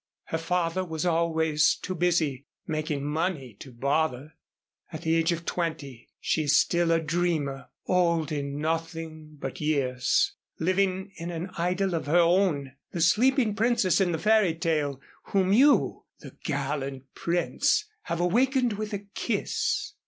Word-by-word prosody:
Her 160 - -1
father 175 +2 0
was 160 -2 -4
always 160 -3 +2
too 185 - -5
busy 160 -6 0 0.2
making 155 -2 -2
money 150 -4 -2
to 135 - -10
bother. 140 +3 -1 0.6
At - - -7
the 160 - +1
age 165 +1 +2
of 170 0 -3
twenty 150 -8 -4
she 160 - 0
is 145 0 +4
still 170 -1 +2
a 165 - +4
dreamer, 160 -4 -1 0.2
old 170 -4 +1
in 140 -1 -3
nothing 160 -1 -4
but 135 +2 -6
years, 135 -5 +1 0.3
living 190 +2 0
in 170 -1 -5
an 175 +2 -5
idyl 180 +2 0
of 165 -3 -2
her 160 +4 +3
own, 170 -6 +2 0.2
the 175 - -4
sleeping 230 - +3
princess 210 -3 +2
in 180 -2 +2
the 165 - -1
fairy 210 -3 +3
tale 150 -5 -1 0.3
whom 190 -1 +1
you, 280 +6 +4 0.2
the - - -11
gallant 140 -2 -2
prince, 175 - +1 0.2
have 170 - -2
awakened 245 +7 +2
with 215 0 -4
a 205 0 -4
kiss." - - -1
165 Hz, 145 wpm, -27 LUFS, 150-180 Hz, 0.6 s, is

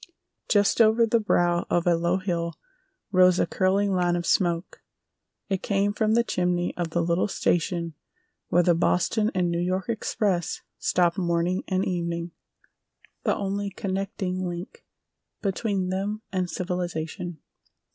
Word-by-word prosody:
Just 205 +2 +4
over 225 +1 +5
the 230 +1 +2
brow 175 -5 +1
of 175 - +1
a 175 -1 +4
low 170 +2 +1
hill 170 -3 -2 0.6
rose 185 -2 +5
a - - +3
curling 195 +1 +1
line 175 -1 +2
of 175 0 -2
smoke. 170 -1 0 0.7
It 195 -2 -1
came 200 0 +1
from 215 +1 +1
the 235 - +4
chimney 180 -4 0
of 175 -2 -2
the 170 +1 0
little 170 +3 +1
station 170 -3 0 0.5
where 175 - +3
the 175 - +4
Boston 180 +6 +2
and 180 -2 +1
New 170 - 0
York 185 +4 -1
Express 205 -5 -1 0.2
stopped 175 0 +2
morning 170 +1 0
and 190 0 0
evening, 170 -1 -2 0.9
the - - +2
only 200 0 -2
connecting 190 -1 -3
link 175 +1 -7 0.6
between 195 -1 -1
them 205 +3 -2
and 185 -2 -1
civilization. 175 -2 -3
180 Hz, 140 wpm, -26 LUFS, 175-195 Hz, 0.9 s, over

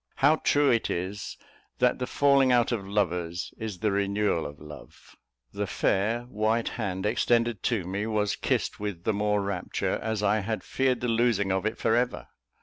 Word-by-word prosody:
How 145 +3 +4
true 145 -2 +3
it 115 -2 +1
is, 95 +4 -4 0.4
that 125 +1 +2
the 125 - -2
falling 140 -2 +4
out 120 -1 +3
of 100 -5 -2
lovers 90 -4 -1
is 110 -4 -5
the 105 -2 +2
renewal 100 -3 0
of 75 - -11
love! 75 -2 -13 0.4
The - - -2
fair, 110 +5 +1
white 115 -1 0
hand 95 -5 -3
extended 115 0 +1
to 110 -8 0
me, 100 +4 -3
was 105 -2 0
kissed - - -1
with 100 -5 -4
the 110 - +1
more 105 0 +1
rapture, 100 -2 -2
as 110 -1 -2
I 105 +1 +3
had 110 +2 -3
feared 130 -2 0
the 125 - -1
losing 115 -4 +2
of 95 +2 0
it 110 - -3
for 110 - +2
ever. 125 +1 -1
105 Hz, 180 wpm, -27 LUFS, 100-120 Hz, 0.4 s, How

